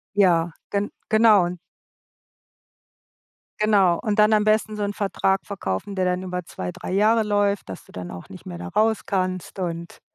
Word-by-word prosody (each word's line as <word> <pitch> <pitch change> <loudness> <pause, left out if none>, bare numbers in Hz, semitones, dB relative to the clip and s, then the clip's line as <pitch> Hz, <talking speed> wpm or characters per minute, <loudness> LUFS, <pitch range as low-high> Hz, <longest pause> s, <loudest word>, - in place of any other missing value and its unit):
Ja, 175 -4 +4 0.2
gen 205 0 -1 0.2
genau. 210 -6 +4 2.0
Genau, 195 -5 +4
und 215 -1 -1
dann 210 +1 +5
am 210 -1 +4
besten 215 0 +2
so 210 - -4
'n 205 0 -3
Vertrag 195 -1 0
verkaufen, 190 - -4
der 185 -1 0
dann 180 +1 0
über 180 -1 -4
2, 90 -1 -5
3 - - -7
Jahre 220 +3 +4
läuft, 205 - 0
dass 95 - -8
du - - -19
dann 90 -1 -7
auch 90 - -10
nicht 95 - -12
mehr 85 - -6
da 90 +1 -7
raus 220 - +2
kannst 185 -1 -2
und 170 -2 -5
195 Hz, 170 wpm, -23 LUFS, 175-210 Hz, 2.0 s, dann